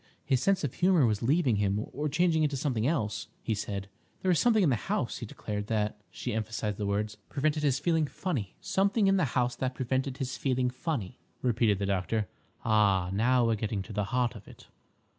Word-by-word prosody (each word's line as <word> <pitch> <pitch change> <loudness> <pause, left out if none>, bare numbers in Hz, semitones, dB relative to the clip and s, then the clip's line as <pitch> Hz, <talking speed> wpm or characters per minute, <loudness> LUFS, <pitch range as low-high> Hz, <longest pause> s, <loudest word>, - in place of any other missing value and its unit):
His 130 -2 +2
sense 195 +1 +2
of 140 - -1
humour 180 -5 +4
was 105 -3 +1
leaving 130 -2 +2
him, 100 +1 0
or 150 +2 -1
changing 160 +1 +2
into 145 -2 +1
something 125 -4 0
else, 110 -8 -1 0.2
he 110 - 0
said. 100 -2 -4 0.4
There 190 - +1
was 175 - +4
something 225 -4 +4
in 155 - +4
the - - +3
house, - - -1
he - - -6
declared, 105 -1 -5
that"—she 105 0 -3
emphasised 110 -1 -2
the 105 - -1
words—"prevented 110 +9 -1
his 140 -3 +2
feeling 160 +1 +1
funny." 135 - -3
"Something 200 +2 +2
in 195 0 +4
the 180 - +3
house 125 0 +1
that 130 -1 -2
prevented 130 +1 -1
his 130 -3 -3
feeling 130 -2 0
funny," 125 - -4 0.2
repeated 115 -4 +2
the 100 - -2
doctor. 100 +2 0 0.4
"Ah, 100 -5 +3
now 120 +4 +3
we're 115 - +3
getting 105 -2 -2
to 105 - -9
the 105 0 0
heart 120 +1 0
of - - -12
it!" - - -14
125 Hz, 200 wpm, -29 LUFS, 105-150 Hz, 0.4 s, humour